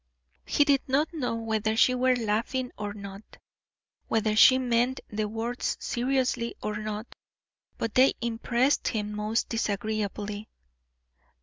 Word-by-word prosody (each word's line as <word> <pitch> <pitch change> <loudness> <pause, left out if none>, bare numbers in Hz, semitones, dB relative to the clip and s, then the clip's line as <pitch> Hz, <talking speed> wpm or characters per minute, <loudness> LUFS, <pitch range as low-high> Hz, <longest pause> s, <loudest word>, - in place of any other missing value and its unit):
He 290 - +4
did 280 -2 +3
not 290 +5 +1
know 255 -7 -2
whether 220 -1 -1
she 255 - +5
were 255 0 +3
laughing 240 +3 -1
or 205 -1 -4
not, 200 -1 -8 0.9
whether 220 -1 +1
she 260 +4 +8
meant 250 0 +1
the 215 0 -2
words 230 +3 -3
seriously 250 -1 -1
or 210 0 -3
not, 215 +1 -5 0.6
but 225 -2 -3
they 260 +1 +5
impressed 235 +3 +1
him 210 -2 -2
most 215 +2 -1
disagreeably. 210 -1 -3
225 Hz, 125 wpm, -27 LUFS, 210-255 Hz, 0.9 s, she